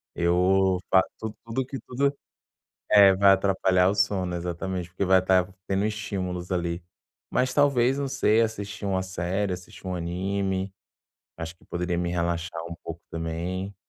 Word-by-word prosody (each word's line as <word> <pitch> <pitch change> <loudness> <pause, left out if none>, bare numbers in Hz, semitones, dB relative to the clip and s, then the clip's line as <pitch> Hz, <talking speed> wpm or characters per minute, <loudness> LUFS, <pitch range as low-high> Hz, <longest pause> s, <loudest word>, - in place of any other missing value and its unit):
Eu 90 +2 +3
fa 95 - +6 0.2
tu 110 -1 -5
tudo 115 +3 -2
que 135 +1 -6
tudo 140 +5 -1 0.8
é, 100 -2 +8
vai 100 +1 +5
atrapalhar 95 -1 +3
o 100 - +1
sono, 100 -3 0
exatamente, 90 +1 -3
porque 90 +3 -2
vai 95 0 +5
estar 95 0 +3 0.2
tendo 100 +2 +1
estímulos 95 -4 -4
ali. 85 0 -1 0.5
Mas 125 0 +1
talvez, 135 -3 +3
não 140 - -1
sei, 115 -4 +3
assistir 110 -1 -4
uma 95 -1 0
série, 95 +2 -2
assistir 90 +1 -11
um 90 - -2
anime, 95 +2 -2 0.6
acho 80 +1 -6
que - - -24
poderia 90 0 -2
me 90 0 -1
relaxar 85 -1 -2
um 85 - -4
pouco 85 0 -7
também. 85 +4 -4
95 Hz, 155 wpm, -26 LUFS, 90-100 Hz, 0.8 s, é